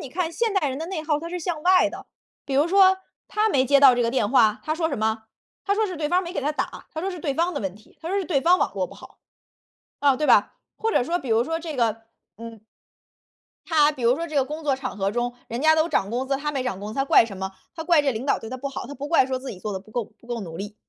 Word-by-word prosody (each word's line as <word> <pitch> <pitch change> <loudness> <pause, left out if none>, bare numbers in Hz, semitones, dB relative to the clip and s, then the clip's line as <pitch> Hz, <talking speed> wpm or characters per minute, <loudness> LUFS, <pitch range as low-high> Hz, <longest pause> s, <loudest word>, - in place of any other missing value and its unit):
你 - - -7
看 335 +2 -2
现 455 +5 0
代 335 -8 +2
人 265 +2 -4
的 325 - -4
内 350 -3 -4
耗 300 -1 0
它 335 +2 -7
是 360 - -3
向 320 -2 -3
外 370 0 +5
的， - - -9 0.4
比 275 - -3
如 290 +5 +3
说 380 0 +5 0.3
他 430 +1 +1
没 265 -7 +3
接 280 +2 +4
到 270 -3 +8
这 245 - +1
个 230 - +1
电 225 -5 0
话， 220 -5 +4
他 310 - -1
说 325 0 0
什 - - -2
么？ 220 0 -1 0.4
他 400 - +2
说 435 +1 +1
是 365 -4 -6
对 300 - -1
方 360 +3 +2
没 345 -1 -6
给 - - -1
他 295 +2 0
打， 300 - -5
他 315 - -3
说 385 +3 -2
是 360 - -7
对 295 -3 -2
方 340 +4 +1
的 - - -2
问 190 -2 -3
题， 215 +1 -20
他 325 - -6
说 400 - +1
是 390 - -2
对 290 -4 +1
方 355 +2 +5
网 - - 0
络 - - -1
不 - - -14
好。 - - -15 0.8
“哦， 280 -2 +4
对 300 +1 -1
吧， - - +5 0.2
或 450 0 -1
者 - - +3
说 340 +7 -1
比 270 - -8
如 225 +1 +3
说 325 +6 -2
这 325 -2 -6
个， 225 -3 0 0.3
嗯 230 -1 -10 1.1
他 305 -2 +4
比 270 -4 -8
如 235 +1 +4
说 335 +4 -4
这 310 - -5
个 275 - +4
工 305 +4 -6
作 280 -3 +1
场 260 -5 -5
合 195 0 0
中， 240 +3 -2 0.2
人 235 +2 -4
家 315 +2 +5
都 315 +1 +2
涨 200 - 0
工 250 +3 -2
资， 275 - +1
他 295 +2 -3
没 270 -3 -1
涨 250 -7 -3
工 205 +1 -6
资， - - -9
他 270 - 0
怪 275 - +6
什 200 -4 -9
么？ 190 0 -4 0.2
他 325 - -5
怪 330 -1 +4
这 290 - -5
个 270 - +3
领 220 +3 -5
导 280 - +1
对 225 - -9
他 255 - -5
不 280 +2 -4
好， 270 - -6
他 285 - -8
不 285 +1 -6
怪 320 -5 +4
说 260 -1 -2
自 260 +1 -7
己 190 - -9
做 210 +3 -5
的 190 - -4
不 210 +3 -19
够 240 +1 -2
不 215 +3 -22
够 240 -1 -4
努 165 -4 -7
力。 205 +1 -6
280 Hz, 335 characters per minute, -24 LUFS, 235-325 Hz, 1.1 s, 到